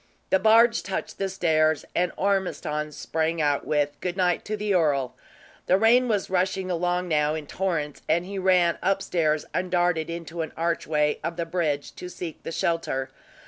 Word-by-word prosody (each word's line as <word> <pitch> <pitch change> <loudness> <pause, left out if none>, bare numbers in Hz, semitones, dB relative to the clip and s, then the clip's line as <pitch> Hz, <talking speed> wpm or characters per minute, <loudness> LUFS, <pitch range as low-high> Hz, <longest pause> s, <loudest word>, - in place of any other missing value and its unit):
The 190 - +5
barge 230 +2 +5
touched 190 - -5
the 195 -1 -1
stairs, 155 -4 +1
and 180 0 +1
Ormiston 180 -6 -1
sprang 160 +2 -2
out, 145 -2 +1
with 145 -1 0
"Good 180 0 -3
night" 180 -2 +1
to 215 0 -3
the 210 -1 -1
earl. 145 -7 +1 0.5
The 185 - +5
rain 240 +4 +4
was 210 -4 0
rushing 185 0 0
along, 180 +1 0
now, 150 -2 +1
in 155 -2 -5
torrents, 155 -4 -2
and 170 +3 +2
he 195 +1 -5
ran 180 -2 +3
upstairs 165 -5 0
and 185 0 -1
darted 175 -3 +1
into 170 0 -5
an 160 - -5
archway 155 -3 0
of 165 +1 -3
the 170 - -1
bridge, 160 -4 -2
to 180 - -7
seek 170 -3 -7
the - - -6
shelter. 150 -6 -1
170 Hz, 175 wpm, -25 LUFS, 155-185 Hz, 0.5 s, The